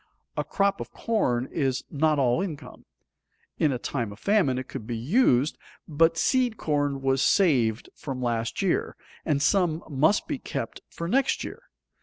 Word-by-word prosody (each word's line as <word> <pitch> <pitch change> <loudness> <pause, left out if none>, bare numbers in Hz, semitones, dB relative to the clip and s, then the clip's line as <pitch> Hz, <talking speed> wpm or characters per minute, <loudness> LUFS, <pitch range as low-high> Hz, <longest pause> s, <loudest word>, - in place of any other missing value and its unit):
A - - -1
crop 200 0 0
of - - -7
corn 130 - 0
is 135 -4 -1
not 155 +1 +2
all 130 +3 +2
income. 165 -7 -7 0.7
In 155 - +3
a 130 - -1
time 120 -3 -3
of 100 - -10
famine 175 - +2
it 130 0 -4
could 110 - -7
be 120 -2 -3
used, 140 - +2 0.3
but 165 +1 +3
seed 250 +2 +2
corn 145 -3 -1
was 135 0 +2
saved 130 - +3
from 135 -3 -6
last 120 +4 -1
year, 185 - 0 0.3
and 145 -3 +1
some 165 -1 +2
must 155 +7 +2
be 290 -3 -3
kept 120 - -5
for 170 - -5
next 270 +7 +1
year. - - -8
145 Hz, 165 wpm, -26 LUFS, 125-180 Hz, 0.7 s, In